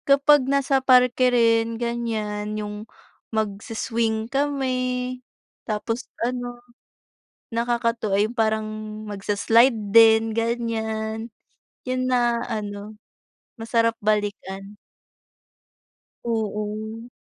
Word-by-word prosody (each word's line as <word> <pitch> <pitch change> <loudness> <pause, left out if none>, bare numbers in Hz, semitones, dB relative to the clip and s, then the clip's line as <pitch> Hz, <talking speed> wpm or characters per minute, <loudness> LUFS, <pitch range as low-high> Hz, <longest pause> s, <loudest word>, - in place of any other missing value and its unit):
Kapag 280 +1 +6
nasa 275 -1 +2
parke 250 -1 +4
rin 230 -1 +2
ganyan 215 -3 -3
yung 210 +1 -6 0.5
magsi-swing 220 +1 -1
kami, 275 -2 0 0.9
tapos 225 +2 -3 0.2
ano 245 0 -3 1.0
nakakatuwa 230 -3 0
ay 210 - +3
yung 235 - -10
parang 220 -2 +1 0.4
magsa-slide 210 +4 +3 0.2
din 225 -1 +6
ganyan. 225 -1 -2 0.5
Yun 255 0 -1
na 240 -2 +2
ano 210 -1 -5 0.6
masarap 230 0 +1
balikan. 205 -1 -2 1.5
Oo. 220 0 -3
225 Hz, 80 wpm, -23 LUFS, 215-240 Hz, 1.5 s, Kapag